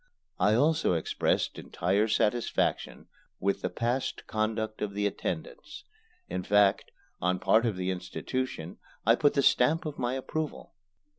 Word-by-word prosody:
I 105 +1 +4
also 150 - +3
expressed 80 - 0
entire 100 +5 0
satisfaction 115 +2 0 0.3
with 100 +1 0
the - - -1
past 120 +3 -2
conduct 110 0 -2
of 100 -1 -3
the 105 0 0
attendants. 465 - -4 0.4
In - - -3
fact, 100 +1 +3 0.3
on 90 +1 +1
part 110 +6 +3
of 110 - -1
the 90 0 -1
institution 90 +1 -4 0.3
I 115 - +6
put 145 +4 +2
the 140 - +3
stamp 155 +9 +3
of 150 -1 -5
my 125 0 0
approval. 155 +3 -4
110 Hz, 140 wpm, -29 LUFS, 100-130 Hz, 0.4 s, I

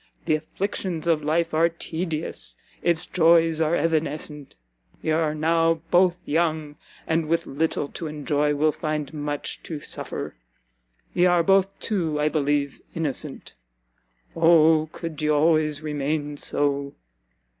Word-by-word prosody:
The 160 - +2
afflictions 170 +1 -3
of 160 -3 +2
life 165 +2 0
are 165 +2 +4
tedious, 165 -1 -4 0.2
its 170 0 +1
joys 165 -2 +4
are 160 +1 +2
evanescent; 150 -2 -2 0.4
ye 160 - -2
are 155 -1 +1
now 165 +1 +2 0.2
both 180 0 +4
young, 155 -1 0 0.3
and, 160 -1 0
with 165 +1 +1
little 145 0 -1
to 165 - -6
enjoy, 150 0 0
will 155 +2 +3
find 155 -1 -3
much 145 -1 -3
to 155 -3 -6
suffer. - - -5 0.8
Ye 175 +1 +4
are 175 -1 +4
both, 195 +2 +3
too, 165 -8 -1
I 150 +1 +2
believe, 145 -2 0
innocent 155 -5 -4 0.8
Oh 160 -1 +5
could 165 -4 -6
ye 150 - +1
always 155 0 +2
remain 150 0 -2
so! 140 -1 0
155 Hz, 130 wpm, -24 LUFS, 150-165 Hz, 0.8 s, Oh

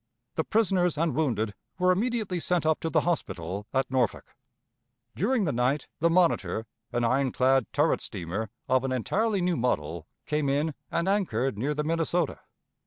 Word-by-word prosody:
The 160 - 0
prisoners 185 -6 +2
and 165 +1 +1
wounded 115 -9 0 0.2
were 180 0 +4
immediately 210 -2 0
sent 175 -1 0
up 160 0 +2
to 165 - -2
the 160 -1 +3
hospital 100 - -2
at 135 -1 0
Norfolk. 125 -5 -1 0.8
During 220 - +1
the 150 - +1
night 125 +4 +1
the 170 - +3
Monitor, 165 -9 +2 0.3
an 120 - 0
iron 130 +2 +2
clad 130 -2 +3
turret - - +2
steamer, 95 +6 -4 0.2
of 130 0 +3
an 135 - -1
entirely 200 - 0
new 180 0 +1
model, 85 -9 -1 0.2
came 150 -2 0
in, 145 +3 +1 0.2
and 170 - -1
anchored 135 - +1
near 140 +8 -1
the 150 - -1
Minnesota. 165 0 0
150 Hz, 165 wpm, -28 LUFS, 125-175 Hz, 0.8 s, were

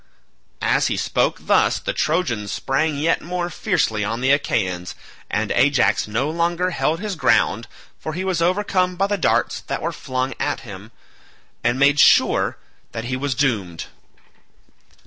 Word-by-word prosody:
As - - +2
he - - -1
spoke - - 0
thus - - +3
the - - -3
Trojans 120 - -1
sprang 145 +2 -1
yet 160 +3 +1
more 175 +1 -3
fiercely 110 - 0
on 115 +3 -2
the 130 +2 +2
Achaeans, 95 -11 -1 0.3
and 105 +1 -1
Ajax 130 -2 +2
no 115 +6 -1
longer 170 +3 0
held 165 -1 0
his 210 -1 -4
ground, 155 - +2 0.3
for 155 - -5
he 180 +4 -3
was 185 -3 -1
overcome 185 0 +1
by 195 +2 +1
the 205 +1 0
darts 185 - 0
that - - -2
were - - -2
flung 130 0 -3
at 145 - -1
him, 105 -2 -10 0.7
and 120 +2 +1
made 140 +2 +4
sure - - +4 0.4
that 115 - -4
he - - +1
was 135 0 -2
doomed. 105 - -1
145 Hz, 155 wpm, -21 LUFS, 115-175 Hz, 0.7 s, made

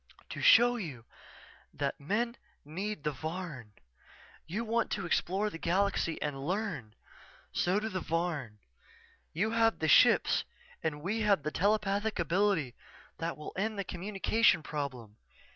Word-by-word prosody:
"_To - - -5
show 240 +1 +7
you 140 - -6 0.7
that - - -3
men 230 +10 -1 0.3
need 185 +2 -4
the 150 - 0
Varn. 155 - -6 0.7
You 210 +8 -3
want 230 +1 0
to 200 -4 -2
explore 195 +4 0
the 165 - -8
galaxy, 185 -2 +1
and 135 -2 -3
learn. 165 - -3 0.6
So 185 +3 +1
do 215 - -3
the 190 -4 -3
Varn. 165 -10 -2 0.7
You 210 +7 0
have 225 -1 +3
the 160 - -1
ships - - +5 0.4
and 150 -2 -3
we 210 +6 -1
have 200 -8 +3
the 155 - -2
telepathic 205 +3 +1
ability 170 -5 +1 0.5
that 165 +1 -3
will 150 - -8
end 215 +2 -1
the 200 - -1
communication 195 +1 +1
problem. 130 -9 -5
180 Hz, 140 wpm, -31 LUFS, 150-210 Hz, 0.7 s, show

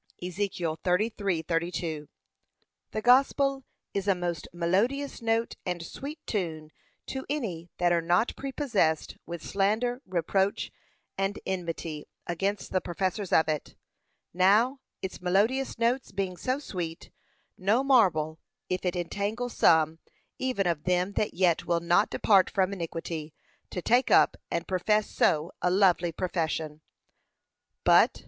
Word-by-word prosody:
(Ezek. 185 +2 -2
33:32) 170 -3 -1 0.8
The 215 - -3
gospel 270 +2 +4 0.3
is 200 0 -2
a 195 - +4
most 175 -3 -3
melodious 215 +13 0
note 230 0 +1
and 175 -2 -3
sweet 290 - -7
tune 160 -7 -3 0.3
to 265 0 -4
any 190 - -3
that 175 -1 +2
are 170 -1 +3
not 175 +7 +2
prepossessed 245 - 0
with 170 -1 -6
slander, 220 +6 0
reproach, 190 +2 0 0.5
and 195 +1 0
enmity 165 -4 -4 0.2
against 195 +4 -2
the 185 - +1
professors 185 +2 -2
of 160 - +4
it. 155 -2 -3 0.6
Now, 210 +9 +4 0.2
its 190 - -5
melodious 215 +11 +1
notes 235 +3 0
being 190 -2 -2
so 255 +8 -1
sweet, 175 - -6 0.4
no 210 +8 +2
marvel 180 - +3 0.3
if 185 - -1
it 180 0 0
entangle 205 +7 -2
some 160 -6 +3 0.4
even 255 -7 0
of 165 -4 -1
them 180 +1 +1
that 210 - -1
yet 175 -3 +2
will 170 -1 +2
not 175 +5 +3
depart 195 -3 +4
from 190 0 +1
iniquity 165 -3 -5 0.3
to 180 - -5
take 245 +3 +3
up - - +5
and - - -2
profess 210 +3 +1
so 155 +1 +1
lovely 180 -1 +4
a - - -8
profession. 160 -3 -2 1.0
But, - - +6
2. - - -11
185 Hz, 130 wpm, -28 LUFS, 170-220 Hz, 1.0 s, But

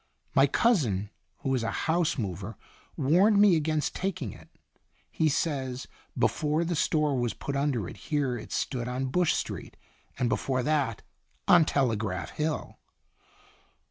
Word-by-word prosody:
My 135 +1 +5
cousin, 120 - +2 0.3
who 135 - 0
is 130 - +1
a 115 - -1 0.2
house 165 -1 +1
mover, 100 -2 -4 0.4
warned 185 +10 +4
me 205 -4 +7
against 155 -1 0
taking 185 - -3
it. - - -15 0.6
He 160 - +2
says 135 -4 -1 0.3
before 155 +2 +1
the 170 +1 -1
store 150 -2 +1
was 120 -2 -1
put 140 - -4
under 140 -8 0
it - - -9
here 140 -5 -1
it 110 - -8
stood 125 -3 -2
on 130 +1 -2
Bush 180 -2 +3
Street, - - -5 0.4
and 125 - +1
before 130 +1 0
that 140 -7 0 0.4
on 175 -3 +7
Telegraph 110 -10 0
Hill." 155 0 -3
140 Hz, 140 wpm, -28 LUFS, 120-160 Hz, 0.6 s, me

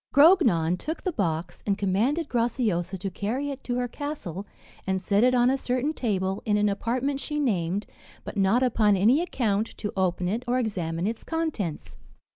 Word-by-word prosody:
Grognon 240 - +5
took 320 +3 -5
the 370 - 0
box, 175 - -2
and 200 -1 +1
commanded 225 - +1
Graciosa 220 -7 0
to 190 +1 -4
carry 255 +10 -2
it 275 0 -8
to 245 - -1
her 245 0 0
castle, 225 - -6 0.4
and 190 0 +1
set 200 +3 +2
it 255 0 +4
on 245 +1 +4
a 270 - 0
certain 255 +5 -1
table, 195 -7 -1
in 210 -1 +1
an 210 0 +3
apartment 250 +7 -1
she 295 +1 -3
named, 195 - 0 0.4
but - - -7
not 200 +5 +3
upon 215 -4 +3
any 235 - +4
account, 225 - -1
to 210 - -4
open 180 -1 0
it 220 +6 -1
or 245 +1 +2
examine 175 -8 -2
its 225 +2 -3
contents. 315 - -3
220 Hz, 180 wpm, -26 LUFS, 190-260 Hz, 0.4 s, Grognon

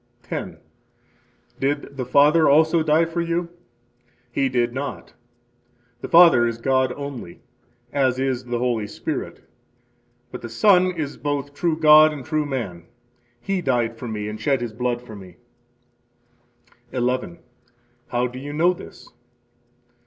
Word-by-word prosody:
10. - - -6 1.0
Did 140 +1 -2
the 130 -2 -4
Father 150 +4 +5
also 160 +3 +4
die 155 +1 +3
for 165 +1 -3
you? 170 0 -2 0.8
He 135 +2 0
did 120 -1 0
not. 140 +2 -6 0.9
The - - -6
Father 165 -9 +7
is 115 -1 -3
God 130 +1 +1
only, 140 -11 -8 0.5
as 130 -3 +1
is 130 -2 -2
the 120 -1 -2
Holy 120 -3 -1
Spirit; - - -6 0.8
but - - -8
the 120 - -7
Son 185 - +4
is 155 -5 -5
both 145 -1 -3
true 160 +1 -1
God 155 0 +7
and 140 -4 -8
true 155 0 -1
man. 100 -12 -5 0.5
He 190 +9 -2
died 120 -6 0
for 120 +2 -8
me 105 -2 -4
and 105 0 -7
shed 140 -3 +1
his 120 -2 -5
blood 120 +1 -2
for 110 -3 -11
me. 95 -3 -12 1.6
11. 130 +8 -2 0.7
How 120 0 0
do 125 +1 -6
you 145 +2 -7
know 170 +4 +3
this? - - -13
135 Hz, 140 wpm, -22 LUFS, 120-155 Hz, 1.6 s, Father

